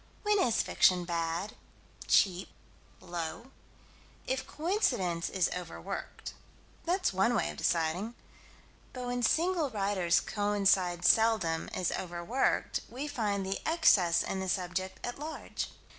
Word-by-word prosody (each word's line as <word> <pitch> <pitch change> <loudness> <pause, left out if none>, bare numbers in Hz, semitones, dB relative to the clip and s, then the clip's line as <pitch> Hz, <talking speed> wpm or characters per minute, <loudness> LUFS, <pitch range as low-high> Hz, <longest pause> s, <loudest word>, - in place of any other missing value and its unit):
When 415 -1 +3
is 240 -11 +2
fiction 180 -1 +3
bad, 170 +3 -2 0.5
cheap, 185 -1 +3 0.5
low? 175 +8 -6 0.7
If 260 0 -2
coincidence 245 - 0
is 185 -3 +1
overworked. 180 -2 -6 0.5
That's 365 - +1
one 195 +6 +2
way 220 - 0
of - - -12
deciding. 175 +8 0 0.8
But 250 -1 -5
with 245 -1 +1
single 340 -3 +1
writers 195 -5 +1
coincidence 195 -4 +1
seldom 220 -8 +3
is 185 -2 0
overworked: 175 +8 -1
we 265 +5 -5
find 210 -8 -1
the 195 +1 -2
excess 210 - +4
in 190 - -3
the 190 0 -3
subject 185 +1 -2
at 245 +2 -5
large. 310 +2 -5
195 Hz, 120 wpm, -31 LUFS, 175-245 Hz, 0.8 s, excess